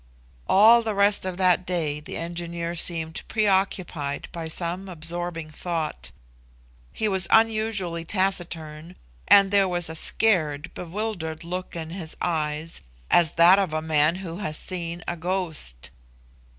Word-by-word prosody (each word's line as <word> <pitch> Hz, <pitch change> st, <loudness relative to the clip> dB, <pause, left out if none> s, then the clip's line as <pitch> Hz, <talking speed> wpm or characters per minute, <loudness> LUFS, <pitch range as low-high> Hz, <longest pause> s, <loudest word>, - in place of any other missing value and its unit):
All 225 Hz, +4 st, +7 dB
the 220 Hz, -2 st, -3 dB
rest 200 Hz, 0 st, +3 dB
of 185 Hz, -1 st, -3 dB
that 185 Hz, -1 st, +3 dB
day 165 Hz, -5 st, -1 dB
the 150 Hz, -, -7 dB
engineer 170 Hz, 0 st, -4 dB
seemed 165 Hz, -1 st, -3 dB
preoccupied 190 Hz, -8 st, 0 dB
by 165 Hz, -1 st, -5 dB
some 175 Hz, +4 st, -4 dB
absorbing 165 Hz, -1 st, -5 dB
thought. 155 Hz, -, -4 dB, 0.8 s
He 215 Hz, -, -1 dB
was 190 Hz, -3 st, +1 dB
unusually 215 Hz, -6 st, +2 dB
taciturn, 170 Hz, -3 st, -2 dB, 0.3 s
and 195 Hz, -1 st, +6 dB
there 200 Hz, -1 st, +4 dB
was 175 Hz, -3 st, -1 dB
a -, -, -7 dB
scared, 160 Hz, -5 st, +1 dB
bewildered 175 Hz, -3 st, -4 dB
look 180 Hz, +2 st, -5 dB
in 160 Hz, -1 st, -5 dB
his 170 Hz, -3 st, -6 dB
eyes, 155 Hz, -1 st, -2 dB, 0.3 s
as 170 Hz, -3 st, +4 dB
that 175 Hz, +3 st, +7 dB
of 190 Hz, -6 st, -1 dB
a 155 Hz, -, -1 dB
man 155 Hz, +1 st, +3 dB
who 165 Hz, 0 st, -6 dB
has 155 Hz, -6 st, -2 dB
seen 170 Hz, -2 st, -4 dB
a 175 Hz, -, -2 dB
ghost. 165 Hz, -, -2 dB
175 Hz, 135 wpm, -25 LUFS, 160-190 Hz, 0.8 s, All